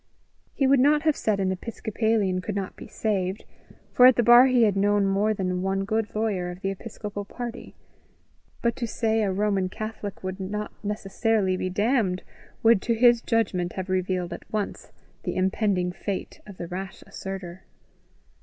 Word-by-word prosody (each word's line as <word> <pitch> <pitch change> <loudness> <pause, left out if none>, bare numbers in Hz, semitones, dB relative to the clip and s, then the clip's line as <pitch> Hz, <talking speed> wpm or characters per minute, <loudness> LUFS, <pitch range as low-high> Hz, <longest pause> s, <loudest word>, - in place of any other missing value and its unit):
He 275 - +2
would 270 0 +5
not 295 +3 +4
have 310 -2 +3
said 210 -2 0
an 190 -1 +1
Episcopalian 220 -1 -1
could 205 +2 -4
not 195 -2 -3
be - - -10
saved, 195 -2 -2 0.5
for 250 - +8
at 255 - +6
the 240 - +2
bar 240 +3 +8
he 250 -2 +4
had 205 -3 +3
known 205 0 +3
more 200 +2 +2
than 185 -3 -1
one 195 +1 -1
good 220 +1 -1
lawyer 205 -5 -1
of 180 +1 -8
the 195 - -1
episcopal 205 0 -6
party; 240 +3 -7 0.9
but 235 0 +2
to 235 - -2
say 225 0 0
a 200 -2 +1
Roman 195 -1 0
Catholic 215 -1 -6
would 185 +1 -4
not 210 +3 -4
necessarily 205 -1 0
be 185 0 -2
damned, 205 -1 +1 0.4
would 225 -3 +5
to 235 - 0
his 240 0 +5
judgment 185 -7 0
have 190 0 -5
revealed 185 -1 -1
at - - -11
once 210 -2 -4 0.3
the - - -3
impending 190 -1 +1
fate 195 +1 -5
of 200 -3 -11
the - - -5
rash 190 +2 -6
asserter. 190 -2 -7
205 Hz, 175 wpm, -25 LUFS, 190-225 Hz, 0.9 s, for